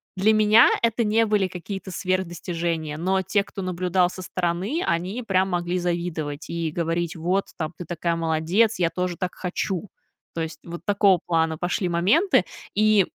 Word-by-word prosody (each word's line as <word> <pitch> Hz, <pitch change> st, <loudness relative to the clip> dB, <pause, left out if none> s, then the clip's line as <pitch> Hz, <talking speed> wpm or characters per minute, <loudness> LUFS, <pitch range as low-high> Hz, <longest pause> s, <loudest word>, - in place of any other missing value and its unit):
для 200 Hz, +3 st, +3 dB
меня 215 Hz, +2 st, +6 dB
это 230 Hz, 0 st, +2 dB
не 225 Hz, +1 st, +2 dB
были 205 Hz, -3 st, +2 dB
какие-то 190 Hz, +1 st, -6 dB
сверх 185 Hz, 0 st, 0 dB
достижения, 165 Hz, -3 st, -3 dB
но 190 Hz, +3 st, +1 dB
те, 200 Hz, +2 st, +1 dB
кто 195 Hz, -, -8 dB
наблюдал 180 Hz, 0 st, +1 dB
со 185 Hz, 0 st, -8 dB
стороны, 185 Hz, -, -1 dB
они 180 Hz, +8 st, -1 dB
прям 190 Hz, -4 st, +1 dB
могли 175 Hz, 0 st, -1 dB
завидовать 170 Hz, -4 st, -3 dB
и 165 Hz, -2 st, -2 dB
говорить: 170 Hz, +1 st, -1 dB
"Вот, 180 Hz, +4 st, 0 dB
там, 155 Hz, +1 st, -3 dB
ты 175 Hz, -, -7 dB
такая 170 Hz, 0 st, -1 dB
молодец, 165 Hz, +6 st, +1 dB
я 170 Hz, -, +3 dB
тоже 180 Hz, +1 st, -3 dB
так 185 Hz, -1 st, -3 dB
хочу", 185 Hz, +1 st, -3 dB, 0.4 s
то 165 Hz, -, -3 dB
есть, 160 Hz, -1 st, -5 dB
вот 170 Hz, 0 st, -8 dB
такого 200 Hz, -3 st, +4 dB
плана 160 Hz, -2 st, +1 dB
пошли 180 Hz, +1 st, -1 dB
моменты. 205 Hz, -, +3 dB, 0.3 s
И, 215 Hz, -2 st, +4 dB
180 Hz, 170 wpm, -24 LUFS, 170-195 Hz, 0.4 s, меня